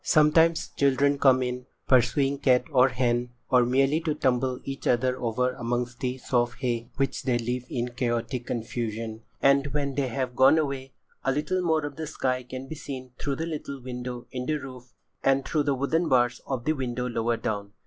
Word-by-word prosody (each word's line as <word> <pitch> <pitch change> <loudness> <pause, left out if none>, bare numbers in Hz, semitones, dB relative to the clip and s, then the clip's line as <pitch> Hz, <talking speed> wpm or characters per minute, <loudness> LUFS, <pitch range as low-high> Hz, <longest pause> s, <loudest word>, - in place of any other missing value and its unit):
Sometimes 160 +2 +4
children 140 +1 +2
come 130 -2 +5
in, 125 0 -4 0.2
pursuing 135 +2 +3
cat 130 -3 +4
or 130 -1 +5
hen, 120 -1 0 0.2
or 125 -1 +6
merely 135 +5 +2
to 155 -2 -1
tumble 130 -2 +1
each 135 0 -5
other 125 +1 +2
over 125 +2 +1
amongst 120 -1 -3
the 125 -1 -2
soft 120 -1 0
hay 120 -2 -1
which 135 -1 -1
they 125 -3 +1
leave 125 +1 -3
in 120 0 -2
chaotic 120 0 -2
confusion, 115 -1 -4 0.2
and 140 +1 +5
when 140 -2 0
they 140 -1 0
have 125 0 -3
gone 130 +5 +6
away, 135 -4 -2 0.3
a 135 - +2
little 155 +7 0
more 160 -3 +1
of 145 -1 -7
the 160 -1 -4
sky 130 -4 -1
can 130 +1 -8
be 160 - -6
seen 130 -4 -7
through 140 -1 -1
the 160 - -3
little 150 -4 -5
window 125 -1 -6
in 125 0 -4
the 155 - +1
roof, 130 -4 -8 0.3
and 135 0 +3
through 155 - +1
the 145 -1 +1
wooden 160 +6 0
bars 120 -1 +2
of 130 -3 -3
the 155 - +3
window 125 -3 -3
lower 115 -1 0
down. 100 -3 -3
130 Hz, 190 wpm, -27 LUFS, 120-140 Hz, 0.3 s, or